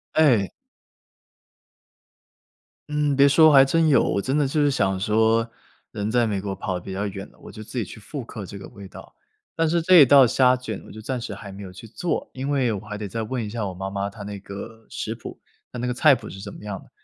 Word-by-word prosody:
哎。 125 -11 +4 2.4
嗯， 150 -1 0
别 140 0 +7
说 155 +2 +6
还 135 -2 +8
真 160 +3 +2
有 135 -5 +5
我 100 - 0
真 135 +7 -1
的 145 - +2
就 150 +3 0
是 145 - +3
想 95 -7 +1
说， 110 +3 +2 0.4
人 105 +1 -3
在 120 +1 +2
美 105 -3 -1
国 95 0 -4
跑 95 0 -4
得 - - -3
比 95 +2 -8
较 100 +2 -2
远 100 -1 -6
了， - - -25
我 - - -12
就 110 - -10
自 110 +4 -9
己 115 - +1
去 110 - -10
复 135 +6 -7
刻 110 -3 -8
这 100 - -9
个 95 - -9
味 100 -1 -11
道， - - -13 0.4
但 165 -1 +2
是 170 0 +1
这 185 +3 +5
一 150 - +10
道 135 0 +7
虾 125 +1 +4
卷 120 -5 -6
我 - - -12
就 110 - -10
暂 130 +2 -3
时 115 -4 -6
还 100 0 -10
没 100 +1 -9
有 95 -1 -9
去 100 - -11
做， 170 +10 -3
因 130 +2 -4
为 135 -5 +1
我 105 - -3
还 105 0 -7
得 105 - -5
再 115 +3 -4
问 115 +1 -3
一 - - -6
下 110 -1 -3
我 95 - -5
妈 95 +2 -5
妈 100 0 -3
她 100 +1 -10
那 100 0 -7
个 100 +3 -10
食 - - -4
谱 - - -10 0.3
她 - - -7
那 120 - -2
个 125 - -1
菜 140 +2 +5
谱 - - -9
是 95 - -9
什 100 +1 -8
么 - - -12
样 105 -2 -6
的。 - - -20
110 Hz, 275 characters per minute, -23 LUFS, 100-135 Hz, 2.4 s, 一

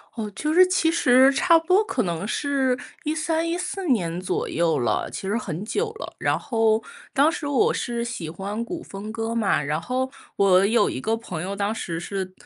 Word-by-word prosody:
哦， 220 -2 -4
就 305 +6 -1
是 370 +1 +7
其 350 -3 +2
实 260 -4 +5
差 335 +4 +5
不 325 - -4
多 380 +4 +4
可 380 - -1
能 170 +2 -3
是 270 -2 0 0.3
13、 320 +1 -1
14 360 +1 -3
年 180 -8 0
左 185 - -2
右 165 -2 +1
了， 120 - 0
其 - - -6
实 205 - 0
很 195 -4 -4
久 430 - -1
了。 450 - -8
然 - - +1
后 225 -3 +1 0.3
当 290 +4 +4
时 295 - -4
我 280 -3 +2
是 235 0 -2
喜 200 -9 -5
欢 200 +7 -4
古 330 +7 -6
风 200 +2 -7
歌 225 0 -3
嘛， 205 -9 +2
然 150 +3 -1
后 260 +5 -2 0.2
我 190 -1 +5
有 230 +2 +3
一 130 - -3
个 225 +6 0
朋 180 -8 -6
友 195 +3 -4
当 205 +2 -1
时 170 -6 -4
是 190 +1 -4
230 Hz, 205 characters per minute, -24 LUFS, 195-300 Hz, 0.3 s, 是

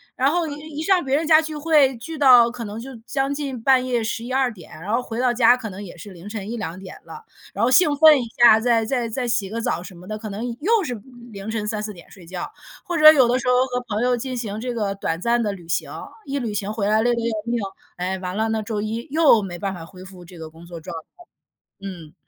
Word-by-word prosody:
然 270 +3 +2
后 340 -1 0
一 290 - -5 0.2
一 - - -2
上 370 -1 +3
别 270 0 0
人 315 +3 0
家 315 -1 +6
聚 310 -1 -6
会 295 -4 +3
聚 315 +7 -8
到 250 -4 +7
可 245 -1 -7
能 210 +1 -6
就 265 +3 -8 0.2
将 275 0 -1
近 275 -4 -5
半 260 +1 +4
夜 240 -3 0
11-12 245 +3 -1
点， 180 - -15
然 190 +6 -4
后 240 - +2
回 230 -1 -6
到 250 -1 +2
家 240 0 +5
可 230 -3 -6
能 195 +1 -8
也 180 -2 -10
是 200 +4 -10
凌 180 +2 -12
晨 210 -1 -6
1-2 205 -7 -5
点 190 -1 -10
了。 450 - -11 0.3
然 - - -2
后 - - +2
兴 295 +4 +5
奋 305 -2 +7
一 - - -4 0.2
下， 230 -2 +9
再 230 -1 +2
再 240 -1 -1
再 245 +2 -3
洗 215 -5 0
个 230 +2 -4
澡 170 -6 -2
什 185 0 -11
么 180 +2 -13
的， 215 +1 -4
可 215 0 -7
能 205 +3 -5 0.2
又 435 +5 +2
是 245 - -3 0.4
凌 200 +2 -7
晨 215 -2 -3
3-4 215 0 -3
点 175 -3 -15
睡 185 -3 -15
觉。 180 +1 -6 0.4
或 345 -1 -2
者 310 0 +10
有 265 -6 +4
的 245 - +2
时 255 - -5
候 - - +4
和 250 -1 -3
朋 215 -1 -2
友 250 0 +2
进 255 +1 -5
行 215 -3 -4
这 250 0 -3
个 205 -4 -2
短 165 -4 -3
暂 235 +2 +2
的 210 - -1
旅 180 -4 -10
行， 165 - -2 0.3
一 280 0 -3
旅 230 -4 -3
行 205 0 -3
回 210 -2 -1
来 215 +1 +3
累 240 +1 +2
得 235 - -2
要 230 -1 -1
命， 235 0 -1 0.4
哎， 185 +2 -2
完 185 0 -5
了 220 +1 +1
呢， 220 -1 -1
周 210 -1 -3
一 225 +4 -4
又 300 -8 +5
没 175 -3 -6
办 195 0 -3
法 170 -3 -8
恢 185 +2 -13
复 185 -1 -13
这 175 +1 -14
个 160 - -8
工 165 +2 -15
作 170 -1 -9
状 170 +2 -8
态。 160 - -9 0.7
嗯。 175 -6 -9
230 Hz, 275 characters per minute, -22 LUFS, 195-255 Hz, 0.7 s, 者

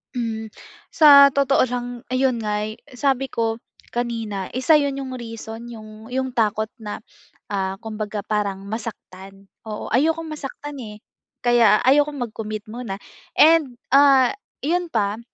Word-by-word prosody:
Hmm, 225 -2 -3 0.4
sa 280 -3 +8
totoo 275 -1 +3
lang 245 0 -3 0.2
ayun 255 -2 +1
nga'y 210 0 -3 0.2
sabi 270 0 +1
ko 225 -1 -2 0.3
kanina 225 -5 -3
1 300 +4 +4
'yon 280 -1 -1
yung 265 -1 -5
reason 230 0 -8
yung, 215 -1 -11
yung 260 0 -1
takot 215 -2 0
na, 210 0 -7 0.5
ah, 190 -1 -1
kumbaga 215 -1 -4
parang 200 -2 -2
masaktan, 195 -3 -8 0.2
oo. 210 -1 -5
Ayokong 320 +6 +1
masaktan, 290 0 -7
eh, 210 -1 -9 0.4
kaya 235 -3 +5
ayokong 290 +2 +3
mag-commit 215 -1 -6
muna 230 -5 -5 0.4
and, 310 -5 +5 0.2
ah, 275 -2 +6 0.3
'yon 345 +4 0
pa 210 -1 0
230 Hz, 130 wpm, -22 LUFS, 215-270 Hz, 0.5 s, sa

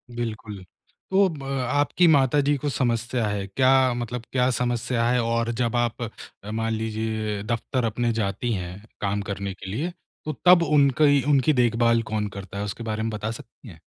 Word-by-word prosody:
बिल्कुल। 110 -4 -5 0.5
तो 195 +1 +5
ब 150 -5 -8 0.3
आपकी 145 +5 +3
माताजी 145 -1 +4
को 145 +2 -2
समस्या 120 -2 0
है, 100 -1 -2
क्या 130 +4 +3
मतलब 120 0 -4
क्या 125 0 +2
समस्या 120 -1 -1
है 125 - +2
और 115 0 0
जब 120 0 0
आप 120 0 0 0.5
मान 115 0 -1
लीजिए 110 -1 -2
दफ़्तर 120 +2 -2
अपने 120 +2 0
जाती 105 +4 -2
हैं 90 +1 -5 0.2
काम 100 0 0
करने 100 0 -4
के 95 0 -9
लिए, 145 - -2 0.3
तो 155 - -2
तब 180 -1 +7
उन 145 -3 +4
कई 145 -3 +5
उनकी 145 +1 +4
देखभाल 115 -1 +3
कौन 105 -1 0
करता 100 0 -8
है, 100 - -2
उसके 105 +3 -5
बारे 110 -1 -2
में 115 - -1
बता 105 +1 -3
सकती 115 +2 -12
हैं? 80 -4 -13
115 Hz, 175 wpm, -24 LUFS, 110-130 Hz, 0.5 s, तब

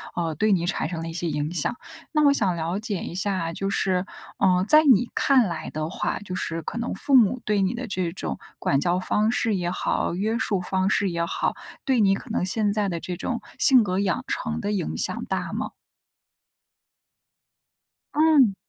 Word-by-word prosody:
呃， 165 -2 -1
对 215 +6 +2
你 175 -2 +1
产 175 - -1
生 165 -1 -5
了 165 - -4
一 - - -7
些 175 +1 -2
影 150 +2 -2
响。 175 +8 0 0.4
那 300 -1 +3
我 285 - +6
想 200 -10 +1
了 170 +4 -2
解 210 -4 -3
一 - - -6
下， 185 -3 -1
就 195 +4 -3
是， 185 -2 0 0.3
呃， 185 -2 +3
在 305 +6 +9
你 245 -3 +5
看 270 -3 +4
来 170 -4 -4
的 155 +1 -4
话， - - -2
就 190 -2 -8
是 165 -3 -3
可 165 - -6
能 235 +1 -3
父 275 - +1
母 240 +1 +3
对 210 -1 +1
你 190 +2 +1
的 245 +1 -5
这 185 -5 -2
种 - - -4 0.2
管 135 - +1
教 175 +4 +1
方 210 +3 +1
式 225 -3 +1
也 175 -2 -1
好， 180 - -1
约 215 +5 -1
束 200 -7 -1
方 190 +1 0
式 200 -1 +1
也 170 -1 -1
好， - - -1 0.3
对 260 -3 +1
你 195 -2 +4
可 235 - -10
能 220 -5 -1
现 205 +2 +1
在 205 -1 0
的 170 -3 -3
这 180 -1 -5
种 235 +5 -3 0.2
性 260 -2 +6
格 185 -2 -1
养 200 +5 0
成 225 -3 -3
的 205 -1 -2
影 190 -6 -2
响 - - -1
大 - - -3
吗？ - - -3 2.4
嗯。 295 -9 +5
195 Hz, 220 characters per minute, -24 LUFS, 175-225 Hz, 2.4 s, 在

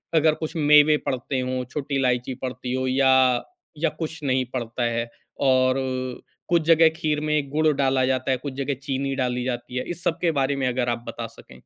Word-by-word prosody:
अगर 155 0 +4
कुछ 160 +2 -6
मेवे 150 0 +6
पड़ते 130 +1 -2
हों, 130 0 -2
छोटी 140 -1 -3
इलायची 125 -1 0
पड़ती 125 0 -4
हो 130 0 -1
या, 130 -1 +4 0.3
या 165 +1 +1
कुछ 160 0 -4
नहीं 130 -1 +1
पड़ता 120 0 -3
है 115 0 -2 0.4
और 130 0 +4 0.7
कुछ 170 -1 +3
जगह 165 -1 +6
खीर 155 -2 -1
में 150 -2 0
गुड़ 155 +2 +1
डाला 135 -2 +2
जाता 130 0 0
है, 130 - +2
कुछ 135 +1 -6
जगह 140 +1 -2
चीनी 135 0 -2
डाली 125 -2 -1
जाती 125 0 -4
है, 125 - -1
इस 175 0 -8
सब 165 - 0
के 170 -2 +2
बारे 135 +1 +1
में 135 -2 -1
अगर 125 -1 0
आप 120 0 -2
बता - - -5
सकें? 65 - -16
130 Hz, 200 wpm, -24 LUFS, 125-150 Hz, 0.7 s, मेवे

